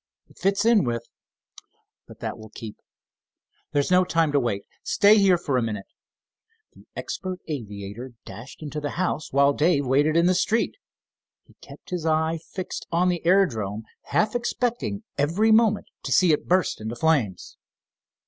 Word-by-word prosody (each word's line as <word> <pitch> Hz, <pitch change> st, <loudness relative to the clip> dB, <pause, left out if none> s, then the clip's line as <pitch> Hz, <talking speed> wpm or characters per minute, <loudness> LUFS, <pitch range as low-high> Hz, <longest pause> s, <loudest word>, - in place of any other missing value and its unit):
It -, -, -20 dB
fits 195 Hz, +2 st, +1 dB
in 230 Hz, -4 st, +5 dB
with—but 115 Hz, -2 st, -10 dB
that -, -, -3 dB
will 110 Hz, 0 st, -11 dB
keep. 105 Hz, 0 st, -9 dB, 1.0 s
There 145 Hz, -, +1 dB
is 140 Hz, -, -1 dB
no 180 Hz, 0 st, +6 dB
time 165 Hz, -3 st, +1 dB
to 145 Hz, -, +3 dB
wait. 105 Hz, -6 st, -2 dB, 0.2 s
Stay 210 Hz, +1 st, +5 dB
here 190 Hz, -3 st, +5 dB
for 145 Hz, -6 st, -1 dB
a -, -, +2 dB
minute." 105 Hz, -4 st, -3 dB, 0.9 s
The -, -, -19 dB
expert 185 Hz, -1 st, -5 dB
aviator 115 Hz, -3 st, -6 dB
dashed 110 Hz, +10 st, -10 dB
into 150 Hz, 0 st, -5 dB
the 145 Hz, +2 st, -4 dB
house, 175 Hz, -4 st, -2 dB
while 140 Hz, +1 st, +4 dB
Dave 150 Hz, -1 st, +2 dB
waited 145 Hz, +5 st, +2 dB
in 170 Hz, -, +4 dB
the 185 Hz, -, +4 dB
street. 220 Hz, +5 st, +1 dB, 0.7 s
He -, -, -22 dB
kept -, -, -14 dB
his 180 Hz, -3 st, -2 dB
eye 160 Hz, +1 st, +1 dB
fixed 185 Hz, -1 st, -5 dB
on 175 Hz, +2 st, +2 dB
the 175 Hz, -2 st, -2 dB
aerodrome, 115 Hz, -, +2 dB, 0.2 s
half 215 Hz, -, +1 dB
expecting 240 Hz, -3 st, -2 dB, 0.2 s
every 175 Hz, +10 st, +2 dB
moment 220 Hz, -2 st, +4 dB, 0.2 s
to -, -, -5 dB
see 180 Hz, -3 st, +5 dB
it 150 Hz, -, -2 dB
burst 180 Hz, -9 st, +1 dB
into 110 Hz, +2 st, -4 dB
flames. 130 Hz, -, 0 dB
160 Hz, 160 wpm, -24 LUFS, 125-185 Hz, 1.0 s, no